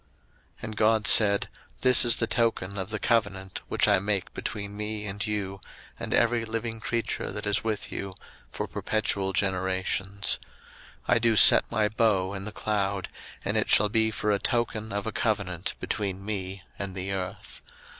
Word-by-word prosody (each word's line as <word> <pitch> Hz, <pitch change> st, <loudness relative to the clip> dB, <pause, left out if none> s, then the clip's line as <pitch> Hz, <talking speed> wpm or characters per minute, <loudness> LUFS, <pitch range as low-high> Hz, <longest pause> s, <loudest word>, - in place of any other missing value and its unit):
01:009:012 -, -, -19 dB
And 110 Hz, -1 st, -7 dB
God 110 Hz, 0 st, +2 dB
said, 100 Hz, -2 st, +6 dB, 0.3 s
This 125 Hz, -1 st, +6 dB
is 120 Hz, -1 st, +6 dB
the 115 Hz, -, 0 dB
token 115 Hz, -4 st, -1 dB
of 95 Hz, +1 st, -5 dB
the 105 Hz, -, -3 dB
covenant 100 Hz, -5 st, -1 dB
which -, -, +1 dB
I 100 Hz, -2 st, +4 dB
make 100 Hz, -1 st, -2 dB
between 100 Hz, -1 st, -6 dB
me 105 Hz, 0 st, -4 dB
and 100 Hz, 0 st, -3 dB
you 100 Hz, -3 st, -4 dB, 0.4 s
and -, -, -6 dB
every 115 Hz, 0 st, +2 dB
living 115 Hz, 0 st, -4 dB
creature 115 Hz, +1 st, -3 dB
that -, -, -6 dB
is 105 Hz, 0 st, +2 dB
with 110 Hz, -2 st, -3 dB
you, 95 Hz, -1 st, -5 dB, 0.3 s
for -, -, -4 dB
perpetual 100 Hz, -3 st, -2 dB
generations: 95 Hz, +1 st, -1 dB, 0.7 s
01:009:013 -, -, +3 dB
I 120 Hz, -, +3 dB
do 115 Hz, -1 st, +2 dB
set -, -, +8 dB
my 105 Hz, 0 st, +1 dB
bow 105 Hz, -4 st, +1 dB
in 95 Hz, -1 st, -6 dB
the 105 Hz, -, -6 dB
cloud, 100 Hz, -3 st, -2 dB, 0.4 s
and -, -, -1 dB
it -, -, 0 dB
shall 105 Hz, 0 st, +5 dB
be 110 Hz, 0 st, +2 dB
for 105 Hz, -1 st, -2 dB
a 100 Hz, -, +1 dB
token 115 Hz, -2 st, -1 dB
of 100 Hz, 0 st, -3 dB
a 110 Hz, -, -3 dB
covenant 100 Hz, -7 st, -2 dB
between 95 Hz, -2 st, -4 dB
me 95 Hz, -3 st, -5 dB, 0.2 s
and 100 Hz, -1 st, -5 dB
the 95 Hz, +1 st, -4 dB
earth. 95 Hz, -2 st, -6 dB
105 Hz, 175 wpm, -26 LUFS, 95-110 Hz, 0.7 s, set